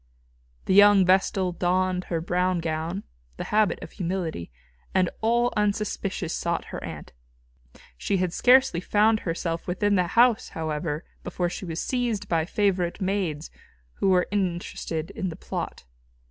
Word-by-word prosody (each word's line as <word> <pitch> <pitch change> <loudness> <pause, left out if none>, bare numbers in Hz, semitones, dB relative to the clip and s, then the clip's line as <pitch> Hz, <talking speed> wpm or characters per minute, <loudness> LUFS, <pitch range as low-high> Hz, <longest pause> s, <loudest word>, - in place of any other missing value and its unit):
The - - +1
young 205 -1 +7
vestal 185 0 +2
donned 180 +1 0
her 165 - -2
brown 180 +2 0
gown, 165 +4 -3 0.3
the - - -3
habit 215 -1 +3
of - - -9
humility, 175 - -3 0.5
and 185 -2 +3
all 240 +2 +2
unsuspicious 205 -3 -1
sought 170 0 -2
her - - -5
aunt. - - -8 0.9
She 195 - 0
had 180 -2 -1
scarcely 255 -6 +4
found 215 +3 +3
herself 165 -2 -3
within 205 +3 +1
the 180 -1 +2
house, 240 -2 +4
however, 155 0 -3 0.2
before 175 0 -2
she 185 - -6
was 165 -1 -3
seized 245 -5 -1
by 165 -2 +1
favourite 190 -3 0
maids, 185 -6 -2 0.5
who 195 - +1
were 180 -1 +3
interested 175 -4 -2
in 190 - -3
the 165 - -7
plot. - - -6
185 Hz, 145 wpm, -25 LUFS, 170-205 Hz, 0.9 s, young